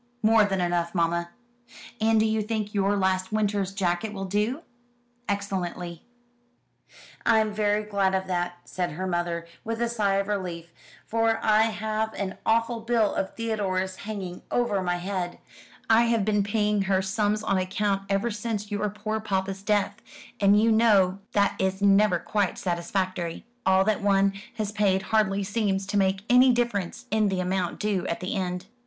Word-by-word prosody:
"More 220 Hz, 0 st, +6 dB
than 195 Hz, -2 st, -1 dB
enough, 175 Hz, 0 st, 0 dB
mamma." 170 Hz, 0 st, 0 dB, 0.7 s
"And 220 Hz, 0 st, +4 dB
do 215 Hz, -, +3 dB
you 220 Hz, 0 st, +1 dB
think 215 Hz, -1 st, -3 dB
your 200 Hz, 0 st, +1 dB
last 190 Hz, 0 st, 0 dB
winter's 205 Hz, -3 st, 0 dB
jacket 195 Hz, +2 st, -1 dB
will 195 Hz, -1 st, -4 dB
do?" 210 Hz, -, -1 dB, 0.7 s
"Excellently." 180 Hz, -4 st, -3 dB, 1.2 s
"I'm 220 Hz, -2 st, +3 dB
very 210 Hz, 0 st, +1 dB
glad 200 Hz, -2 st, +1 dB
of 190 Hz, 0 st, -1 dB
that," 175 Hz, -1 st, -2 dB
said 180 Hz, -4 st, -3 dB
her 185 Hz, +5 st, -4 dB
mother, 175 Hz, -2 st, -2 dB, 0.2 s
with 225 Hz, 0 st, -3 dB
a 235 Hz, -, +1 dB
sigh 210 Hz, -4 st, +1 dB
of 195 Hz, 0 st, 0 dB
relief, 175 Hz, -5 st, -4 dB, 0.3 s
"for 225 Hz, 0 st, +1 dB
I 215 Hz, +1 st, +4 dB
have 220 Hz, 0 st, -2 dB
an 195 Hz, -1 st, -4 dB
awful 230 Hz, +1 st, +2 dB
bill 225 Hz, -2 st, +1 dB
of 190 Hz, -, -3 dB
Theodore's 190 Hz, -5 st, -2 dB
hanging 195 Hz, -4 st, -6 dB
over 235 Hz, -5 st, +1 dB
my 175 Hz, -1 st, 0 dB
head. 180 Hz, 0 st, -3 dB, 0.5 s
I 225 Hz, +1 st, +5 dB
have 230 Hz, -3 st, +1 dB
been 210 Hz, -1 st, +2 dB
paying 210 Hz, 0 st, +1 dB
her 190 Hz, 0 st, +1 dB
sums 210 Hz, +2 st, 0 dB
on 195 Hz, -3 st, +1 dB
account 195 Hz, +1 st, 0 dB
ever 200 Hz, +4 st, +1 dB
since 210 Hz, -1 st, -4 dB
your 205 Hz, 0 st, -1 dB
poor 215 Hz, +2 st, -3 dB
papa's 195 Hz, -2 st, -2 dB
death; 205 Hz, +1 st, 0 dB, 0.4 s
and 200 Hz, +1 st, +5 dB
you 225 Hz, +1 st, +3 dB
know 200 Hz, -4 st, +4 dB
that 200 Hz, -1 st, +2 dB
is 190 Hz, 0 st, 0 dB
never 200 Hz, -1 st, +4 dB
quite 200 Hz, +2 st, -1 dB
satisfactory. 175 Hz, -1 st, -2 dB, 0.2 s
All 190 Hz, 0 st, +5 dB
that 215 Hz, +1 st, 0 dB
one 195 Hz, -1 st, +3 dB, 0.2 s
has 210 Hz, -2 st, -2 dB
paid 200 Hz, -3 st, +1 dB
hardly 200 Hz, -2 st, +2 dB
seems 195 Hz, -1 st, -1 dB
to 195 Hz, -, -4 dB
make 190 Hz, 0 st, +1 dB
any 250 Hz, +1 st, +6 dB
difference 235 Hz, -7 st, -1 dB
in 215 Hz, -1 st, +2 dB
the 190 Hz, -1 st, -1 dB
amount 185 Hz, -1 st, -1 dB
due 205 Hz, -3 st, -1 dB
at 170 Hz, -, -2 dB
the 185 Hz, -, -3 dB
end." 180 Hz, -2 st, -3 dB
200 Hz, 165 wpm, -26 LUFS, 190-215 Hz, 1.2 s, More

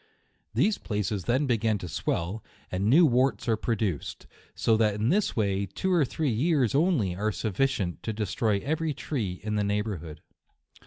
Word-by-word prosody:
These 215 Hz, 0 st, +2 dB
places 105 Hz, -3 st, -2 dB
then 130 Hz, +5 st, +2 dB
begin 115 Hz, -4 st, +1 dB
to 90 Hz, -, -7 dB
swell, 90 Hz, +5 st, -2 dB, 0.3 s
and 95 Hz, +2 st, -1 dB
new 150 Hz, +11 st, +6 dB
warts 130 Hz, -1 st, +2 dB
are 115 Hz, -, +3 dB
produced; 110 Hz, -, -2 dB, 0.3 s
so 115 Hz, -, +2 dB
that 110 Hz, -2 st, +2 dB
in 105 Hz, +3 st, 0 dB
this 205 Hz, +6 st, +1 dB
way, 100 Hz, -2 st, 0 dB
two 185 Hz, -, -1 dB
or 170 Hz, -4 st, +4 dB
three 145 Hz, +1 st, -1 dB
years 135 Hz, 0 st, +2 dB
only 140 Hz, -, +2 dB
are 105 Hz, +3 st, 0 dB
sufficient 105 Hz, -3 st, -1 dB
to 110 Hz, -, -3 dB
destroy 105 Hz, 0 st, 0 dB
every 160 Hz, 0 st, -1 dB
tree 105 Hz, -, -3 dB
in 105 Hz, 0 st, -1 dB
the 105 Hz, -, +1 dB
neigh 105 Hz, +1 st, 0 dB
bourhood. 80 Hz, -8 st, -6 dB
110 Hz, 170 wpm, -27 LUFS, 100-135 Hz, 0.3 s, new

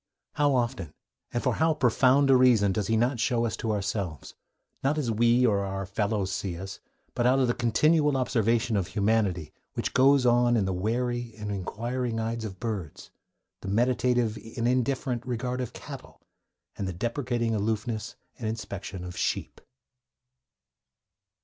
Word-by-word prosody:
How 145 Hz, -2 st, +2 dB
often, 120 Hz, -, -2 dB, 0.4 s
and 120 Hz, -, -2 dB
for -, -, +2 dB
how 160 Hz, 0 st, +2 dB
profound 135 Hz, +1 st, +4 dB
a -, -, +7 dB
reason, 120 Hz, -6 st, +5 dB
does 100 Hz, 0 st, -1 dB
he 110 Hz, -, +2 dB
not 120 Hz, +2 st, +1 dB
show 120 Hz, +1 st, +1 dB
us 110 Hz, -, -2 dB
to 110 Hz, -, -2 dB
ourselves, 100 Hz, -6 st, -3 dB, 0.5 s
not 140 Hz, +3 st, +1 dB
as 130 Hz, -7 st, 0 dB
we 120 Hz, +3 st, +4 dB
or 105 Hz, -4 st, +3 dB
our 95 Hz, 0 st, -3 dB
fellows 100 Hz, 0 st, -1 dB
see 90 Hz, -2 st, -3 dB
us, 95 Hz, +2 st, -7 dB, 0.3 s
but 120 Hz, -1 st, +1 dB
out 130 Hz, +2 st, +4 dB
of 130 Hz, -2 st, +3 dB
the 120 Hz, -, +2 dB
continual 150 Hz, +5 st, +3 dB
observation 115 Hz, -2 st, +1 dB
of 95 Hz, -4 st, 0 dB
humanity 100 Hz, -7 st, 0 dB, 0.2 s
which -, -, -2 dB
goes 135 Hz, 0 st, +5 dB
on 120 Hz, 0 st, +4 dB
in 100 Hz, -, +1 dB
the 95 Hz, -, -1 dB
wary 120 Hz, +4 st, -2 dB
and 105 Hz, -1 st, -5 dB
inquiring 115 Hz, +5 st, -3 dB
eyes 115 Hz, 0 st, -2 dB
of 95 Hz, -4 st, -6 dB
birds, 100 Hz, -10 st, -5 dB, 0.5 s
the -, -, -7 dB
meditative 120 Hz, +1 st, +1 dB, 0.2 s
and 115 Hz, 0 st, +1 dB
indifferent 125 Hz, -1 st, 0 dB
regard 125 Hz, 0 st, -3 dB
of 125 Hz, -, -4 dB
cattle, -, -, -10 dB, 0.6 s
and 100 Hz, -, -3 dB
the 95 Hz, -, -3 dB
deprecating 120 Hz, -, -1 dB
aloofness 110 Hz, +1 st, -2 dB, 0.2 s
and 115 Hz, -, -3 dB
inspection 100 Hz, -4 st, -5 dB
of 90 Hz, -1 st, -7 dB
sheep? -, -, -2 dB
115 Hz, 160 wpm, -27 LUFS, 100-125 Hz, 0.6 s, a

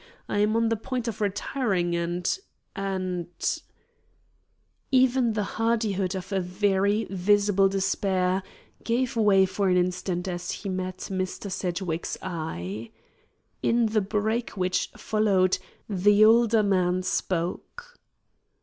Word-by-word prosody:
I 205 Hz, -, -1 dB
am 210 Hz, +1 st, +2 dB
on 230 Hz, 0 st, +2 dB
the 225 Hz, -, +2 dB
point 245 Hz, +2 st, -4 dB
of 220 Hz, -1 st, -4 dB
retiring 200 Hz, -3 st, 0 dB
and 175 Hz, -, -1 dB, 0.4 s
and 185 Hz, -3 st, -2 dB, 0.6 s
" -, -, -41 dB, 0.7 s
Even 255 Hz, -2 st, +3 dB
the 210 Hz, -1 st, 0 dB
hardihood 210 Hz, -4 st, 0 dB
of 185 Hz, 0 st, -6 dB
a 195 Hz, -, +1 dB
very 200 Hz, +3 st, +1 dB
visible 200 Hz, +1 st, +3 dB
despair 190 Hz, -1 st, 0 dB, 0.4 s
gave 240 Hz, +2 st, 0 dB
way 205 Hz, -4 st, +5 dB
for 190 Hz, +1 st, 0 dB
an 180 Hz, -, +3 dB
instant 180 Hz, 0 st, -1 dB
as 175 Hz, -1 st, -4 dB
he 200 Hz, -, -4 dB
met 185 Hz, 0 st, -3 dB
Mr. 185 Hz, +1 st, -3 dB
Sedgwick's 175 Hz, -2 st, -3 dB
eye. 110 Hz, -, -5 dB, 0.7 s
In 235 Hz, 0 st, +3 dB
the 215 Hz, -1 st, +1 dB
break 215 Hz, +3 st, -1 dB
which 185 Hz, 0 st, 0 dB
followed, 200 Hz, -4 st, +2 dB, 0.3 s
the 205 Hz, +1 st, +5 dB
older 225 Hz, -1 st, +5 dB
man 185 Hz, -2 st, +1 dB
spoke. 185 Hz, -, -3 dB
195 Hz, 120 wpm, -26 LUFS, 180-215 Hz, 0.7 s, way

